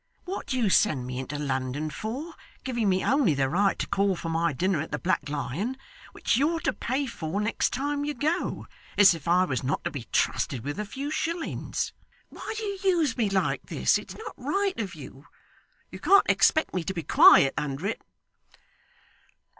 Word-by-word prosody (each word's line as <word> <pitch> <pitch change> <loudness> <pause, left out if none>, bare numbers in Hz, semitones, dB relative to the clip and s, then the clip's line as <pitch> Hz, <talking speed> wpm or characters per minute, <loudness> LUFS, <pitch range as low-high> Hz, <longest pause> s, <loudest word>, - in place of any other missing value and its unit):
What 380 +2 -5
do 260 - -1
you 235 -4 +2
send 150 -14 +3
me 125 0 -5
into 135 +2 -5
London 135 +1 -2
for, 255 - -5 0.3
giving 240 -5 0
me 185 0 +1
only 265 - +3
the 135 -1 +1
right 195 +7 +1
to - - -2
call 195 -1 +1
for 165 - -5
my 165 +1 +1
dinner 175 +3 0
at 160 - -6
the - - -1
Black 170 -5 -1
Lion, 150 - -3 0.3
which - - 0
you're 320 +5 +1
to - - 0
pay 265 +4 -2
for 185 -6 -4
next 210 +1 0
time 285 +3 -2
you 295 0 -3
go, 315 +8 -1 0.3
as 200 -3 +8
if 165 -1 -9
I 180 +2 +4
was 130 -8 -2
not 135 +4 -1
to - - -2
be 130 -6 -7
trusted 125 -4 0
with 145 +8 -4
a 210 - -2
few 275 +7 -5
shillings? 330 +1 -3 0.4
Why 440 - -7
do 445 - -4
you 400 -2 -3 0.2
use 300 -7 +1
me 225 -5 +1
like 195 -1 -1
this? - - +2
It's - - -10
not 445 - -8
right 395 -4 -1
of 195 -6 -4
you. 140 0 -12 0.6
You - - -8
can't 400 +1 +5
expect 315 - +3
me 180 - -1
to 190 - -3
be 165 - -3
quiet 135 -1 +7
under 145 +3 -3
it. 210 - -2
195 Hz, 195 wpm, -27 LUFS, -, 0.6 s, as